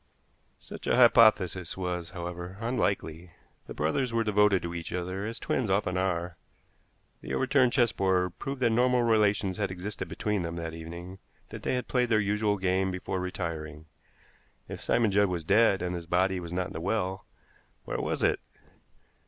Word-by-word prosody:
Such - - -10
an - - +3
hypothesis 110 -8 +4
was, 90 -2 -3
however, 90 +1 -6
unlikely. 95 -8 -2 0.3
The - - -8
brothers 95 - 0
were 115 0 +1
devoted 105 -2 +3
to 85 0 -4
each 85 -2 -6
other, 90 +3 -3
as 115 +1 -5
twins 120 -6 -1
often 95 -1 +1
are; 90 -2 -1 0.8
the - - -4
overturned 130 -1 +3
chessboard 95 -8 +1
proved 135 -2 -5
that 115 - +4
normal 125 +1 +3
relations 105 -4 +2
had 100 -2 -1
existed 95 +3 -5
between 105 -2 -2
them 85 0 -4
that 85 -1 -5
evening, 85 +3 -8 0.3
that - - -8
they - - -1
had 125 - -3
played 125 -2 +1
their 110 -2 +4
usual 105 0 +1
game 95 0 +1
before 95 +1 -3
retiring. 80 -4 -5 0.8
If - - -7
Simon 115 -3 +2
Judd 100 +1 +4
was 90 -3 -3
dead, 100 -1 +4
and 90 0 -2
his 85 -1 -6
body 95 +2 +1
was 85 -1 -7
not 90 +1 -1
in - - -8
the 80 - -5
well, 95 0 -2 0.6
where - - -3
was - - -2
it? - - +2
95 Hz, 170 wpm, -28 LUFS, 90-110 Hz, 0.8 s, hypothesis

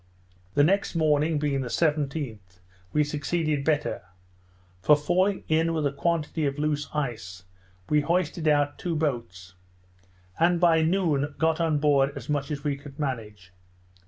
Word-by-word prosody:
The 145 - +5
next 195 +3 +1
morning, 155 0 +2
being 145 -2 0
the 130 - -4
17th, 135 - -2 0.3
we 150 - +3
succeeded 150 0 -1
better; 150 -1 0 0.8
for, 150 +11 +6
falling 185 +6 +1
in 165 +1 +1
with 155 -2 0
a 140 - +1
quantity 155 +1 -1
of 140 0 -3
loose 150 -1 -1
ice, 110 - -4 0.4
we 150 0 +3
hoisted 170 +1 -1
out 145 -1 +2
two 170 -2 -2
boats; 105 - -3 0.9
and 170 +1 +3
by 165 -2 +4
noon 160 -5 +1
got 160 +1 +1
on 160 -2 +2
board 140 -2 +3
as 135 -1 -8
much 145 -2 -1
as 145 -2 -4
we 145 -2 0
could 140 -1 -12
manage. 105 - -5
150 Hz, 150 wpm, -26 LUFS, 140-160 Hz, 0.9 s, for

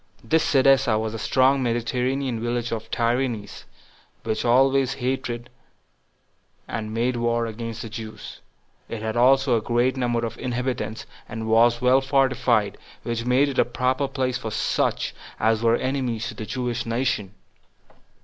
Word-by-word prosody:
This 160 +8 +2
Cydessa 135 -4 +4
was 110 0 -3
a 115 - -5
strong 130 +4 +3
Mediterranean 125 +1 -1
village 120 0 -2
of 110 -1 -3
the - - -24
Tyrians, 120 -3 -1 0.6
which 110 0 -2
always 135 +2 +3
hated 125 -2 -3 1.2
and 110 -1 -4
made 120 +2 0
war 120 0 +1
against 115 0 -5
the 115 - -7
Jews; 110 0 -8 0.5
it 110 -1 -5
had 110 0 -2
also 130 +1 +4
a 115 - +1
great 120 +3 +1
number 120 -2 0
of 115 0 -6
inhabitants, 125 -3 -3 0.2
and 110 0 -5
was 115 +2 +4
well 130 +2 +5
fortified, 130 -5 +1 0.2
which 115 -1 -3
made 130 +3 +3
it 135 - -2
a - - +7
proper 130 +3 0
place 130 -2 -2
for 110 - -4
such - - 0 0.3
as 110 0 +2
were 115 0 +4
enemies 125 -3 -2
to - - -6
the 110 0 -7
Jewish 120 -2 -2
nation. 115 -4 -1
120 Hz, 150 wpm, -24 LUFS, 115-130 Hz, 1.2 s, a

